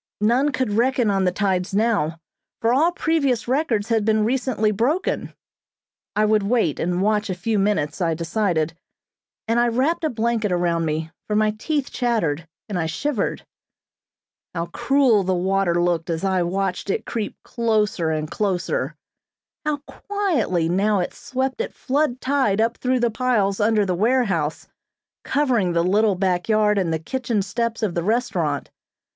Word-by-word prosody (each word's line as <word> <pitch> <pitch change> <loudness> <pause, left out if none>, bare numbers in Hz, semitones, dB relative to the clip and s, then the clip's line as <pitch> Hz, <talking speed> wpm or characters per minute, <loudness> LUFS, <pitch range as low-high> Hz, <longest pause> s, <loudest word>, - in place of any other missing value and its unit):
None 250 +7 +3
could 255 -4 -1
reckon 240 0 +2
on 195 -1 +1
the 180 - +3
tides 190 0 -1
now, 200 -8 +1 0.4
for 230 +1 +2
all 315 +7 +4
previous 285 -9 0
records 245 -6 0
had 225 -2 +2
been 215 0 +2
recently 240 -3 +1
broken. 255 - 0 0.8
I 215 - +3
would 215 0 +3
wait 200 - +1
and 180 +2 0
watch 210 0 +1
a 185 - -1
few 205 +4 -1
minutes, 195 -5 0
I 165 -2 +1
decided, 170 -2 0 0.7
and 230 +1 +2
I 240 - +3
wrapped 265 +9 0
a 315 - +2
blanket 225 -3 0
around 170 -2 +1
me, 160 +1 -2 0.2
for 210 - -1
my 215 0 +3
teeth 280 +6 -2
chattered, 175 - -1 0.2
and 200 -5 -2
I 160 - 0
shivered. 255 - -2 1.1
How 170 0 -1
cruel 270 -6 +3
the 185 0 0
water 185 -1 +1
looked 175 -2 0
as 165 +1 -2
I 190 -2 +1
watched 190 +2 -2
it - - -1
creep 220 -3 -3
closer 215 -7 0
and 155 -1 -1
closer. 205 - -1 0.7
How 300 -1 0
quietly 320 - -1
now 200 +4 +2
it 180 - -2
swept 260 - -3
at - - -5
flood 275 -2 0
tide 260 -8 +1
up 230 +2 +1
through 255 -1 0
the 240 -1 +2
piles 215 -5 +1
under 210 -1 +3
the 185 - 0
warehouse, 195 - 0 0.6
covering 245 -11 +1
the 170 0 +2
little 205 +3 +3
back 180 0 0
yard 210 -1 +3
and 175 -4 0
the 160 - +1
kitchen 230 - -2
steps 230 +3 -2
of 200 -5 0
the 170 - -1
restaurant. 175 - -1
210 Hz, 165 wpm, -22 LUFS, 180-245 Hz, 1.1 s, all